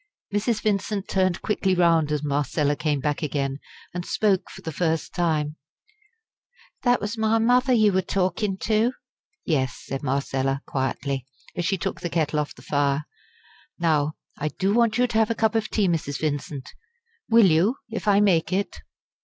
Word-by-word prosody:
Mrs. 215 Hz, +2 st, 0 dB
Vincent 205 Hz, -1 st, 0 dB
turned 185 Hz, -2 st, +1 dB
quickly 195 Hz, -3 st, +1 dB
round 165 Hz, -4 st, +3 dB
as 150 Hz, -1 st, -1 dB
Marcella 145 Hz, 0 st, 0 dB
came 150 Hz, -1 st, 0 dB
back 145 Hz, +2 st, -1 dB
again, 140 Hz, -2 st, -2 dB, 0.3 s
and 175 Hz, 0 st, -3 dB
spoke 195 Hz, 0 st, +1 dB
for -, -, -12 dB
the 160 Hz, -, -4 dB
first 160 Hz, 0 st, -1 dB
time: 155 Hz, -3 st, 0 dB, 1.2 s
"That 245 Hz, -1 st, +3 dB
was 210 Hz, +3 st, -4 dB
my 220 Hz, +1 st, +3 dB
mother 250 Hz, +3 st, +3 dB
you 215 Hz, -4 st, +4 dB
were 190 Hz, -, +3 dB
talkin' 190 Hz, +1 st, -1 dB
to?" 225 Hz, +3 st, +2 dB, 0.5 s
"Yes," 130 Hz, -6 st, 0 dB
said 135 Hz, 0 st, -4 dB
Marcella, 135 Hz, 0 st, -1 dB
quietly, 135 Hz, 0 st, -2 dB, 0.3 s
as 175 Hz, -, -2 dB
she 195 Hz, -, +1 dB
took -, -, -4 dB
the 175 Hz, -, -2 dB
kettle 155 Hz, -3 st, 0 dB
off 150 Hz, -, -3 dB
the 125 Hz, -, -15 dB
fire. 140 Hz, +1 st, 0 dB, 0.7 s
"Now 155 Hz, -3 st, +1 dB, 0.3 s
I 150 Hz, -, -1 dB
do 190 Hz, +7 st, 0 dB
want 230 Hz, -1 st, +3 dB
you 250 Hz, -, +4 dB
to 235 Hz, -2 st, -1 dB
have 220 Hz, -, +3 dB
a 230 Hz, -, 0 dB
cup 220 Hz, 0 st, +2 dB
of 225 Hz, -2 st, 0 dB
tea, 205 Hz, -3 st, +1 dB
Mrs. 155 Hz, -5 st, -1 dB
Vincent. 145 Hz, -3 st, -3 dB, 0.6 s
Will 230 Hz, -2 st, +7 dB
you, 185 Hz, +8 st, +3 dB, 0.2 s
if 225 Hz, -, -4 dB
I 205 Hz, 0 st, +5 dB
make 185 Hz, -5 st, +3 dB
it?" 195 Hz, +2 st, -1 dB
175 Hz, 170 wpm, -24 LUFS, 145-210 Hz, 1.2 s, Will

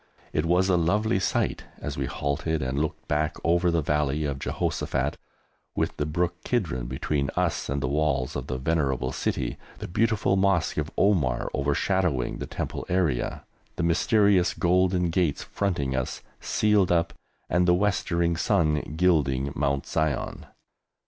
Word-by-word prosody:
It 75 Hz, +2 st, 0 dB
was 90 Hz, +2 st, +3 dB
a 95 Hz, -2 st, +3 dB
lovely 105 Hz, +6 st, +2 dB
sight -, -, -1 dB
as -, -, -4 dB
we -, -, -2 dB
halted 75 Hz, +2 st, -2 dB
and 65 Hz, +2 st, -1 dB
looked 75 Hz, 0 st, -3 dB
back 75 Hz, +1 st, 0 dB
over 85 Hz, +1 st, +3 dB
the 85 Hz, -2 st, +1 dB
Valley 75 Hz, 0 st, 0 dB
of 70 Hz, -2 st, -3 dB
Jehoshaphat, -, -, -1 dB, 0.6 s
with -, -, -1 dB
the 75 Hz, -, -1 dB
brook 85 Hz, +2 st, -1 dB
Kidron 80 Hz, -, -1 dB
between 70 Hz, +2 st, -1 dB
us -, -, 0 dB
and 70 Hz, 0 st, -1 dB
the -, -, +1 dB
walls 70 Hz, -2 st, 0 dB
of -, -, -4 dB
the 65 Hz, -, -2 dB
venerable 65 Hz, -3 st, 0 dB
city, -, -, -2 dB, 0.2 s
the -, -, -6 dB
beautiful 105 Hz, 0 st, +1 dB
Mosque 95 Hz, -3 st, +2 dB
of 75 Hz, 0 st, -1 dB
Omar 80 Hz, -12 st, +2 dB
overshadowing 70 Hz, 0 st, 0 dB
the -, -, -5 dB
Temple -, -, -4 dB
area, 85 Hz, -9 st, 0 dB, 0.3 s
the -, -, -2 dB
mysterious 95 Hz, +2 st, +3 dB
Golden 90 Hz, 0 st, +2 dB
Gates 80 Hz, -4 st, 0 dB
fronting 70 Hz, -10 st, -1 dB
us, 65 Hz, -1 st, -3 dB, 0.2 s
sealed 105 Hz, -4 st, +2 dB
up, 85 Hz, -1 st, +2 dB, 0.3 s
and 90 Hz, +2 st, +2 dB
the 90 Hz, -, +5 dB
westering 85 Hz, -3 st, +1 dB
sun 75 Hz, -2 st, +1 dB
gilding 70 Hz, -6 st, +2 dB
Mount 70 Hz, -1 st, 0 dB
Zion. 80 Hz, -3 st, -2 dB
80 Hz, 150 wpm, -26 LUFS, 70-90 Hz, 0.6 s, the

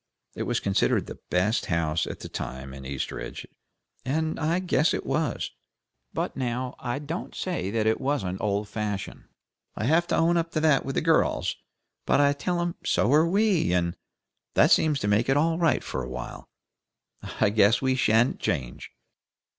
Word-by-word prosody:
It -, -, -4 dB
was -, -, +1 dB
considered 100 Hz, -1 st, +1 dB
the -, -, -9 dB
best 95 Hz, +6 st, +1 dB
house 85 Hz, -2 st, 0 dB
at -, -, -7 dB
the -, -, -6 dB
time 65 Hz, +1 st, -6 dB
in 65 Hz, -1 st, -8 dB
Eastridge, 70 Hz, -1 st, -5 dB, 0.6 s
and 155 Hz, +4 st, -1 dB
I 165 Hz, +2 st, +1 dB
guess 180 Hz, -3 st, +2 dB
it -, -, -4 dB
was. 140 Hz, -1 st, -1 dB, 0.6 s
But -, -, -3 dB
now, 125 Hz, 0 st, -2 dB
I 120 Hz, 0 st, -3 dB
don't 150 Hz, +5 st, -5 dB
say 175 Hz, -, -2 dB
but 110 Hz, +1 st, +1 dB
what 140 Hz, -1 st, 0 dB
it's 90 Hz, +1 st, -4 dB
old 105 Hz, 0 st, 0 dB
fashioned. 105 Hz, -2 st, -4 dB, 0.5 s
I -, -, -4 dB
have 165 Hz, +8 st, +3 dB
to -, -, +1 dB
own 170 Hz, +1 st, +3 dB
up 165 Hz, 0 st, 0 dB
to 155 Hz, -, +1 dB
that 155 Hz, -4 st, +4 dB
with 135 Hz, -, -4 dB
the -, -, +1 dB
girls, 165 Hz, 0 st, +2 dB, 0.5 s
but -, -, +4 dB
I 145 Hz, 0 st, +4 dB
tell 175 Hz, +5 st, -2 dB
them 175 Hz, 0 st, -2 dB
so 130 Hz, -, +2 dB
are 155 Hz, +3 st, +5 dB
we, 195 Hz, -, +2 dB
and 85 Hz, 0 st, +1 dB, 0.6 s
that -, -, +5 dB
seems 150 Hz, -3 st, +4 dB
to 105 Hz, -, -1 dB
make 105 Hz, +5 st, +2 dB
it 135 Hz, -, +4 dB
all 165 Hz, +2 st, +2 dB
right 165 Hz, -5 st, +2 dB
for 65 Hz, -, -4 dB
a 60 Hz, -, -6 dB
while. 65 Hz, -1 st, -7 dB, 0.9 s
I 100 Hz, -, +3 dB
guess 105 Hz, +2 st, +4 dB
we 130 Hz, -1 st, +1 dB
sha'n't 120 Hz, -1 st, +2 dB
change." 60 Hz, -3 st, -3 dB
130 Hz, 180 wpm, -26 LUFS, 100-160 Hz, 0.9 s, are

